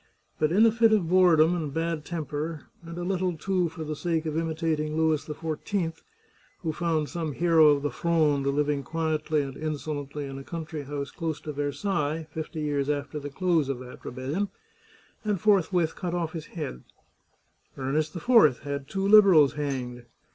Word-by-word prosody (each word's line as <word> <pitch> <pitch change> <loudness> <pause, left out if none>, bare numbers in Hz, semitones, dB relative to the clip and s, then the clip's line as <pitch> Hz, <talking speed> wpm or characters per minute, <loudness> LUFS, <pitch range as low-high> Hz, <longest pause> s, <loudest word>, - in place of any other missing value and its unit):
But 155 0 +2
in 210 +6 +5
a 225 - +5
fit 225 0 +4
of 195 -6 +2
boredom 175 -2 +5
and 155 -5 -3
bad 165 0 -2
temper, 155 -1 -4 0.2
and 170 0 -8
a 175 - -3
little, 180 -2 -1
too, 180 +1 0
for 160 0 -7
the 155 0 -4
sake 165 0 -1
of 155 -1 -2
imitating 160 -1 -1
Louis 160 -2 +2
XIV, 160 +2 -3 0.6
who 160 -2 -1
found 160 -2 0
some 165 -3 -4
hero 165 0 +5
of 145 -1 +4
the 145 - 0
Fronde 155 -5 +1
living 145 0 +1
quietly 155 +1 -1
and 135 -1 -7
insolently 150 -2 -4
in 135 0 -7
a - - -8
country 160 -2 -6
house 140 0 -4
close 160 -3 -3
to 150 - -6
Versailles 150 +2 -1
fifty 160 +1 -5
years 145 -2 -1
after 145 +1 -2
the 145 0 -6
close 160 -1 +1
of 135 - -1
that 125 0 -11
rebellion, 140 +11 -3 0.7
and 210 -3 0
forthwith 180 -5 +2
cut 175 -2 -3
oflf 170 -2 -2
his 160 -2 -6
head, 150 - -6 0.9
Ernest 150 +4 -1
IV 175 - +4
had 140 -1 -4
two 195 +4 -1
Liberals 190 -9 +7
hanged. 130 -4 -4
155 Hz, 170 wpm, -27 LUFS, 145-170 Hz, 0.9 s, Liberals